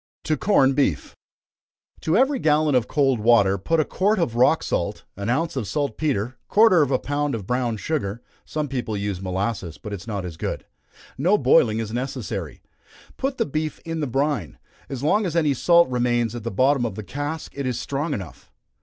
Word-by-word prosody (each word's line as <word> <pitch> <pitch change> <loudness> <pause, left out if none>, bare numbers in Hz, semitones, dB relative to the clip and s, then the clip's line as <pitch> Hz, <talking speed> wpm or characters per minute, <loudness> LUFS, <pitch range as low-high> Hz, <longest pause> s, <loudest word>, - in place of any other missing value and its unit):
To 155 - +1
Corn 135 -5 +3
Beef. 130 - 0 0.8
To 160 +4 +1
every 265 +2 +3
gallon 155 -3 +2
of 125 -2 +2
cold 135 -5 +2
water, 105 -4 +4
put 165 - +1
a 155 - +3
quart 205 +3 +1
of 145 -10 0
rock 125 +2 +4
salt, - - -2
an 100 +3 -4
ounce 160 +5 0
of 120 -7 -2
salt 140 +8 -1
petre, 130 -5 -1
quarter 210 -6 +5
of 145 - +2
a 130 - +2
pound 145 -1 -2
of 105 -4 -6
brown 125 0 -1
sugar 115 -5 -3 0.2
(some 155 -1 -3
people 125 -6 -3
use 100 -2 -3
molasses, 95 -2 -3
but 105 - -7
it - - -3
is - - -14
not 100 -4 -3
as 85 -3 -7
good) - - -4 0.5
no 180 +9 +4
boiling 110 - +4
is 110 -1 -4
necessary. 125 -3 -4 0.5
Put 270 0 -2
the - - +1
beef 155 +1 -3
in 165 -1 -3
the 150 - -1
brine. 130 - -1 0.3
As 135 -1 -5
long 205 +7 +2
as 170 - -4
any 155 -4 +3
salt 170 +6 +4
remains 120 -2 0
at 120 -2 -6
the 115 - -2
bottom 130 +5 +2
of 110 -5 -2
the 110 - -6
cask 145 - -5
it 140 -2 -3
is 125 - -2
strong 145 +2 -2
enough. 95 -7 -9
130 Hz, 200 wpm, -23 LUFS, 110-155 Hz, 0.8 s, quarter